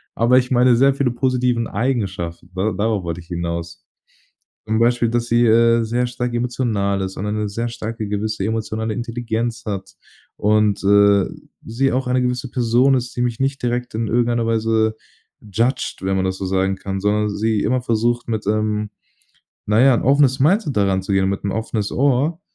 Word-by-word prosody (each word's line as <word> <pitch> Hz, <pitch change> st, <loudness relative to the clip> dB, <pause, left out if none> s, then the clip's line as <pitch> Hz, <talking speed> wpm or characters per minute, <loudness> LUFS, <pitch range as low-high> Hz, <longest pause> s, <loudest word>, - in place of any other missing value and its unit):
aber 120 Hz, +2 st, +4 dB
ich 125 Hz, 0 st, +1 dB
meine 125 Hz, -1 st, +4 dB
sehr 135 Hz, +3 st, +4 dB
viele 140 Hz, -3 st, 0 dB
positiven 125 Hz, -1 st, 0 dB
Eigenschaften, 100 Hz, -8 st, -3 dB
ne? 95 Hz, +3 st, 0 dB
Darauf 105 Hz, -1 st, 0 dB
wollte 85 Hz, 0 st, -4 dB
ich 85 Hz, -, -19 dB
hinaus. 85 Hz, -1 st, -5 dB, 0.8 s
Zum 110 Hz, +1 st, +1 dB
Beispiel, 120 Hz, 0 st, +2 dB
dass 120 Hz, 0 st, -1 dB
sie, 120 Hz, +1 st, +3 dB
äh, 115 Hz, +1 st, +4 dB
sehr 120 Hz, +2 st, -1 dB
stark 125 Hz, 0 st, -4 dB
emotional 115 Hz, -5 st, -1 dB
ist 95 Hz, 0 st, -5 dB
und 100 Hz, -, -4 dB
eine 105 Hz, 0 st, -2 dB
sehr 115 Hz, +4 st, -3 dB
starke 115 Hz, -1 st, -5 dB
gewisse 105 Hz, 0 st, -2 dB
emotionale 110 Hz, 0 st, -2 dB
Intelligenz 115 Hz, -1 st, -3 dB
hat 100 Hz, -3 st, -5 dB, 0.4 s
und, 105 Hz, -1 st, +2 dB
äh, 100 Hz, 0 st, +4 dB, 0.4 s
sie 135 Hz, +4 st, 0 dB
auch 130 Hz, +1 st, -1 dB
eine 125 Hz, 0 st, +1 dB
gewisse 125 Hz, +1 st, -2 dB
Person 125 Hz, +2 st, +3 dB
ist, 125 Hz, -1 st, -3 dB
die 120 Hz, -, -2 dB
mich 120 Hz, -2 st, -1 dB
nicht 135 Hz, +1 st, -1 dB
direkt 125 Hz, 0 st, -2 dB
in 110 Hz, 0 st, -1 dB
irgendeiner 120 Hz, +1 st, +1 dB
Weise, 110 Hz, -1 st, +1 dB, 0.5 s
judged, 115 Hz, +5 st, -1 dB
wenn 95 Hz, 0 st, -1 dB
man 95 Hz, 0 st, 0 dB
das 95 Hz, 0 st, -2 dB
so 95 Hz, -, -4 dB
sagen 95 Hz, +1 st, 0 dB
kann, 95 Hz, 0 st, -4 dB
sondern 105 Hz, +1 st, +1 dB
sie 110 Hz, 0 st, 0 dB
immer 130 Hz, +1 st, 0 dB
versucht 120 Hz, 0 st, 0 dB
mit, 110 Hz, -3 st, -3 dB
ähm, 105 Hz, 0 st, 0 dB, 0.8 s
na 105 Hz, +2 st, +3 dB
ja, 135 Hz, 0 st, +6 dB
'n -, -, 0 dB
offenes 135 Hz, 0 st, +3 dB
Mindset 155 Hz, -, +2 dB
da 100 Hz, -, +3 dB
ranzugehen 95 Hz, 0 st, 0 dB
und 95 Hz, -, +1 dB
mit 100 Hz, -, -4 dB
'n 100 Hz, -, -1 dB
offenes 110 Hz, -2 st, -3 dB
Ohr. 140 Hz, +5 st, +1 dB
115 Hz, 185 wpm, -20 LUFS, 105-125 Hz, 0.8 s, ja